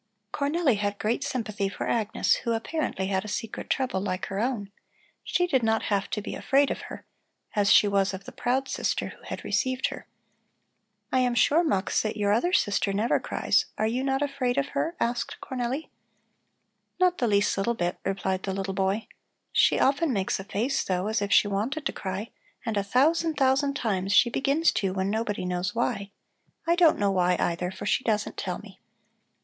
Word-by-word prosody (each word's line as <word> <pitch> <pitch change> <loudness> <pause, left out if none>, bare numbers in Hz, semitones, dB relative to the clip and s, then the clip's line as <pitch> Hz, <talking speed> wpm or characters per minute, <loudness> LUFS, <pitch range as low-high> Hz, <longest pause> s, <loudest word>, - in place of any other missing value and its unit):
Cornelli 285 -4 +1
had 205 0 -1
great 230 +7 -1
sympathy 215 -7 -2
for 195 - -5
Agnes, 220 -3 +1
who 235 - -2
apparently 225 -4 -2
had 190 -1 0
a - - -8
secret 220 +1 -5
trouble 255 -8 0
like 185 -2 -2
her 195 - -4
own; 220 -4 -2 0.5
she 355 - +1
did 270 -7 +2
not 220 -1 +1
have 200 -1 0
to 210 - -3
be - - -5
afraid 275 +1 +2
of - - -4
her, - - -9 0.5
as 205 0 +3
she 210 - +7
was 195 -1 +2
of 190 0 -7
the - - -10
proud 255 +2 -1
sister - - -1
who - - -14
had - - -6
received 260 0 0
her. - - -9 1.0
"I 260 - +3
am 250 -1 +2
sure, 290 +9 +4
Mux, 200 - +1
that 215 0 -3
your 205 -1 +1
other 345 +12 +2
sister 205 - +2
never 210 +4 +1
cries. - - +1
Are 215 - +1
you 240 +4 0
not 270 +1 +1
afraid 275 -3 -1
of 280 +1 +1
her?" 335 +2 -2
asked 240 +1 -1
Cornelli. 260 +4 -4 1.1
"Not 365 -1 +3
the 240 - +2
least 200 -1 +2
little 215 +4 0
bit," 175 -3 -2
replied 190 -1 -1
the 195 - -3
little 195 0 -3
boy. 195 +3 0 0.5
"She - - +4
often 285 +3 +2
makes 195 -5 0
a - - -5
face, 230 +8 -1
though, 185 +2 -1
as 220 -1 0
if 200 0 -2
she 205 - +5
wanted 225 +10 -2
to - - -1
cry 190 +3 -5 0.3
and 225 -2 -1
a 200 - +2
thousand, 310 +9 +2
thousand 275 +1 +2
times 195 -7 -1
she 240 +3 +5
begins 285 +6 +2
to 190 -2 -1
when 190 +1 0
nobody 210 -3 -2
knows 180 +2 -2
why. 215 -4 -1 0.6
I 335 - +3
don't 345 -3 +5
know 200 -1 +2
why, 180 -1 +2
either, 175 +1 0
for 190 - -8
she - - +1
doesn't 210 -2 0
tell 180 -2 -3
me." 200 -3 -14
220 Hz, 195 wpm, -27 LUFS, 195-265 Hz, 1.1 s, she